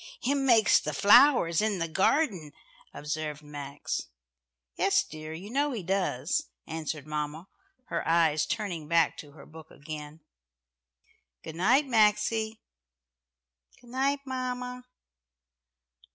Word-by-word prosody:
"Him 275 +1 +1
makes 225 -4 +5
the 150 -1 -4
flowers 210 - +5
in 215 -2 0
the 165 -1 -2
garden," 190 - +1 0.4
observed 150 0 -5
Max. 145 -1 -5 0.7
"Yes, - - +2
dear, 155 0 -9
you 185 +7 -8
know 285 +2 0
He 215 -6 -4
does," 180 -6 -1 0.2
answered 155 -2 -5
mamma, 150 +3 -4 0.4
her 170 -1 -3
eyes 160 -2 +3
turning 175 -8 -3
back 165 0 +3
to 145 -2 -11
her 150 - -14
book 160 0 -13
again. 150 +1 -9 1.2
"Good 160 - -8
night, 255 - +3
Maxie." 220 -1 +1 1.2
"Good 240 - -17
night, 275 +2 0
mamma. 250 -1 -4
170 Hz, 115 wpm, -28 LUFS, 155-240 Hz, 1.2 s, makes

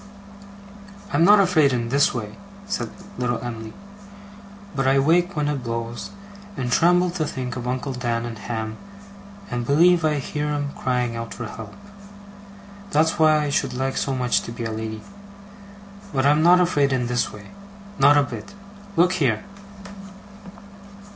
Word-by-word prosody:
'I'm 165 - +4
not 205 +3 +7
afraid 165 -7 +4
in 120 -2 -1
this 140 +3 +3
way,' 105 -4 -5 0.3
said 205 - -3 0.3
little 120 -1 0
Em'ly. 110 -2 -6 1.0
'But 135 -1 0
I 135 +1 +4
wake 175 +7 +2
when 150 -1 0
it 145 -3 -2
blows, 115 0 -4 0.5
and 125 -2 -2
tremble 180 +4 +4
to 170 -3 -2
think 125 -3 -4
of 125 -1 -5
Uncle 130 +2 -2
Dan 120 -2 -2
and 115 -2 -7
Ham 110 +1 -4 0.7
and 120 0 -2
believe 170 +6 +4
I 155 -1 +2
hear 150 +1 -3
'em 145 -1 -2
crying 125 -2 -1
out 115 0 -6
for 120 - -5
help. 110 -1 -9 1.1
That's 160 -2 +2
why 155 -1 +5
I 145 - -2
should 140 - -1
like 135 +1 -2
so 135 - -1
much 125 -2 +1
to - - -8
be 115 0 -6
a 115 - -3
lady. 110 0 -5 1.1
But 135 -2 0
I'm 150 +2 +4
not 175 +2 +6
afraid 145 -6 +2
in 130 -2 0
this 120 0 -1
way. 100 -2 -12 0.5
Not 145 +2 +6
a 145 - +5
bit. 120 - -8 0.4
Look 175 +2 +4
here! 115 -6 +1
130 Hz, 160 wpm, -23 LUFS, 120-150 Hz, 1.1 s, not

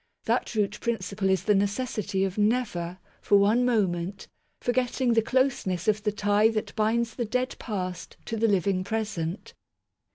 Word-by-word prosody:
That - - 0
root 210 -1 0
principle 195 -4 -1
is 190 -1 +2
the 210 - +3
necessity 205 -1 0
of 190 -1 -1
never, 210 -6 0 0.2
for 205 - +4
one 210 +5 +4
moment, 195 -5 0 0.3
forgetting 250 0 +1
the 225 - +4
closeness 225 - 0
of 215 0 +2
the 210 0 0
tie 205 +1 +3
that 220 -1 -3
binds 225 +1 +1
the 240 - -2
dead 250 +4 -1
past 185 -5 -5
to 225 - -3
the 225 +1 +2
living 195 -2 +1
present. 205 -4 -3
210 Hz, 155 wpm, -27 LUFS, 190-230 Hz, 0.3 s, for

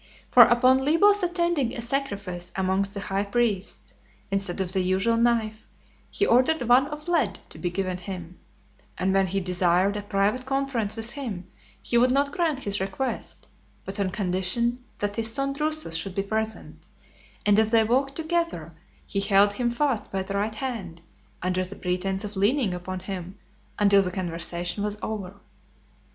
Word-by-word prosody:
For 250 - +9
upon 255 +2 +4
Libo's 405 +8 +4
attending 345 -8 0
a - - -3
sacrifice 200 -9 -3
amongst 190 +1 0
the 200 - -3
high 195 0 -1
priests, 205 -2 -1 0.4
instead 195 -2 -1
of 185 -1 0
the 190 - +1
usual 190 +5 +1
knife, 230 -2 +1 0.4
he 405 - 0
ordered 260 +3 +3
one 245 +3 +5
of 300 +2 -8
lead 290 - +1
to - - -12
be 175 - -1
given 185 0 -2
him; 180 -1 -7 0.6
and 190 +1 +1
when 195 0 +3
he 195 +2 -1
desired 180 +1 +2
a 210 - -2
private 205 +5 0
conference 270 -6 -1
with 225 +1 0
him, 230 -11 -5 0.4
he 235 - +2
would 250 +1 +4
not 280 +2 +2
grant 315 -5 0
his 200 0 -2
request, 195 +8 -4 0.4
but 195 +2 -5
on 195 -2 +1
condition 200 +6 -1
that 205 +1 -3
his 225 0 0
son 275 +3 -1
Drusus 310 - -2
should 180 +3 -3
be 195 - 0
present; 220 +2 -4 0.6
and 205 0 +5
as 220 0 +3
they 225 -1 +5
walked 265 +5 +1
together, 325 - -2 0.3
he 200 - -2
held 200 0 +4
him 240 +3 0
fast 245 -1 -1
by 190 -1 -1
the 195 +1 -6
right 210 +2 -1
hand, 215 -10 -5 0.4
under 185 0 0
the 185 +2 -7
pretence 190 +2 -2
of 210 0 -6
leaning 205 +1 +2
upon 185 +1 -5
him, 190 0 -6 0.4
until 200 -1 +5
the 185 - -1
conversation 175 +1 -3
was 210 0 -2
over. 200 -3 -4
205 Hz, 170 wpm, -26 LUFS, 190-255 Hz, 0.6 s, For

